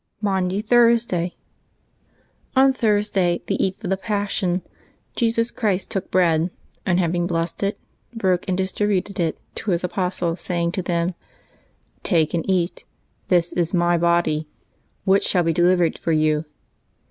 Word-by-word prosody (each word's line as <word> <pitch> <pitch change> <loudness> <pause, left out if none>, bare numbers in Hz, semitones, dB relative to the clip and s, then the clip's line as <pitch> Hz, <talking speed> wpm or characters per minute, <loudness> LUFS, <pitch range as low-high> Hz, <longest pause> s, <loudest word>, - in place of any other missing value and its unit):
MAUNDY 195 -1 0
THURSDAY. 230 -7 +3 1.2
ON 265 0 +5
Thursday, 205 -7 +1
the - - 0
eve 195 +3 -2
of 190 - -3
the 190 - +1
Passion, 200 -3 -1 0.5
Jesus 230 -1 +1
Christ 200 -5 -1
took 195 -4 -3
bread, 170 -2 +2 0.4
and, 180 -1 +2
having 175 0 0
blessed 165 -1 -2
it, 200 +1 -1 0.3
broke 190 -6 0
and 180 - 0
dis 190 0 -1
tributed 200 -2 -1
it 165 -2 -1
to 220 - -5
His 175 -1 +1
apostles, 180 -2 -1
saying 170 -1 0
to 185 +1 -2
them, 175 0 -1 0.5
" - - -40
Take 160 -4 +3
and 165 -2 0
eat: 180 -2 0 0.4
this 175 -2 +2
is 175 +1 0
My 175 0 +3
body, 170 -2 +1 0.6
which 195 0 +4
shall 180 -2 +2
be 165 0 +1
delivered 175 0 +2
for 165 - -1
you." 155 0 +2
180 Hz, 145 wpm, -22 LUFS, 170-200 Hz, 1.2 s, ON